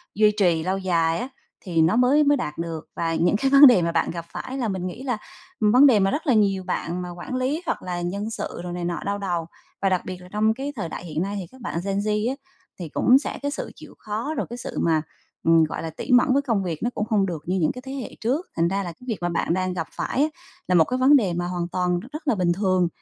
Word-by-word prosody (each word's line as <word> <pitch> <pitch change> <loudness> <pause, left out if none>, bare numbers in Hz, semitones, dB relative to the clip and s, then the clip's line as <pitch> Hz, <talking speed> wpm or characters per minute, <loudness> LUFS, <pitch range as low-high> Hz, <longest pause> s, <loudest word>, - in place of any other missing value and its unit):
duy 215 0 +5
trì 170 -4 +3
lâu 190 +3 0
dài 170 -3 +1
á, 245 - -3 0.3
thì 170 -4 0
nó 165 +6 +3
mới 255 +5 +4
mới 290 -1 +4
đạt 150 -11 -4
được. 165 -1 -5
Và 165 -1 -1
những 175 +4 +2
cái 270 +6 +1
vấn 280 0 +10
đề 230 -8 +6
mà 170 - 0
bạn - - 0
gặp 170 -1 -6
phải 260 - -5
là 245 -4 -1
mình 185 -2 -2
nghĩ 230 +9 -7
là 250 -5 -1 0.4
vấn 230 +6 +6
đề 225 -6 +5
mà 195 0 +2
rất 310 +1 -3
là 255 - +5
nhiều 195 -3 +2
bạn 180 0 -3
mà 180 - -5
quản 175 +9 -6
lý, 265 +6 -1
hoặc - - -2
là 180 -1 -3
nhân 200 +5 -3
sự, 220 - -5
rồi 175 0 -5
này 175 -1 -3
nọ 175 0 -2
đau 200 0 -1
đầu. 175 -4 -2 0.4
Và 195 - +3
đặc 185 -1 +1
biệt 185 -1 -5
là 180 - -12
trong 215 +1 +2
cái 275 +4 -5
thời 170 -8 -4
đại 175 - -7
hiện 160 0 -3
nay, 200 +2 -2
thì 185 - -5
các 260 -1 -16
bạn 170 - -3
gen 195 0 -1
Z 210 +2 0
á 265 - -2 0.4
thì 170 -4 -5
cũng 250 - +5
sẽ - - -5
cái 285 0 -2
sự 295 - -5
chịu - - -13
khó, 220 +8 -3
rồi - - -1
cái 240 - -6
sự - - -7
mà, 160 -2 +2 0.4
ừm, 165 0 +5
gọi 155 - -3
là, 165 - -3
tỉ 160 - -6
mẩn 250 +1 +5
với 280 - +3
công 230 -8 0
việc 165 -4 -3
nó 240 - +1
cũng 210 - -1
hông 205 -3 +3
được 165 -5 -5
như 185 +2 0
những 155 - +2
cái 250 - -9
thế 265 - -6
hệ 270 -3 -6
trước. 270 +10 0
Thành 165 +1 +2
ra 195 +2 -1
là 175 - -5
cái 250 +10 -16
việc 225 -4 -2
mà 175 - 0
bạn 170 0 0
đang 185 0 -1
gặp 165 -3 -3
phải 270 - -2
á, 305 - +3 0.4
là 180 - +2
một 165 - +7
cái 255 - -2
vấn 275 +3 +6
đề 195 -10 +2
mà 175 +1 -2
hoàn 175 -1 -2
toàn 180 0 0
rất 300 - -9
là - - +3
bình 180 -3 +2
thường 185 -2 +2
195 Hz, 290 wpm, -24 LUFS, 175-245 Hz, 0.4 s, vấn